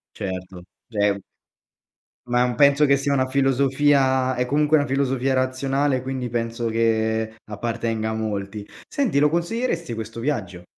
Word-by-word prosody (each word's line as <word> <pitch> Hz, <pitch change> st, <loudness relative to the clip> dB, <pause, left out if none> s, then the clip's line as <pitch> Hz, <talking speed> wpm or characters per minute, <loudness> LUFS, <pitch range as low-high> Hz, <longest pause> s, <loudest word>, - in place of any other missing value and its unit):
Certo, 90 Hz, -2 st, -6 dB, 0.2 s
già 105 Hz, -3 st, 0 dB
è 100 Hz, -1 st, +1 dB, 1.1 s
Ma, 125 Hz, 0 st, +2 dB
uhm, 125 Hz, -1 st, -1 dB
penso 140 Hz, 0 st, +5 dB
che 140 Hz, -1 st, +4 dB
sia 140 Hz, +1 st, 0 dB
una 130 Hz, -1 st, +2 dB
filosofia 135 Hz, 0 st, +2 dB
è 125 Hz, 0 st, 0 dB
comunque 150 Hz, +4 st, +2 dB
una 145 Hz, -1 st, +2 dB
filosofia 135 Hz, -1 st, 0 dB
razionale, 130 Hz, +1 st, 0 dB
quindi 130 Hz, -1 st, -3 dB
penso 115 Hz, 0 st, -2 dB
che 110 Hz, -1 st, 0 dB
appartenga 110 Hz, 0 st, -2 dB
a -, -, -2 dB
molti, 105 Hz, -1 st, -4 dB, 0.2 s
senti 265 Hz, -, 0 dB
lo 150 Hz, +1 st, +4 dB
consiglieresti 170 Hz, -, -1 dB
questo 110 Hz, +1 st, -6 dB
viaggio? 95 Hz, -10 st, -3 dB
130 Hz, 145 wpm, -23 LUFS, 110-140 Hz, 1.1 s, penso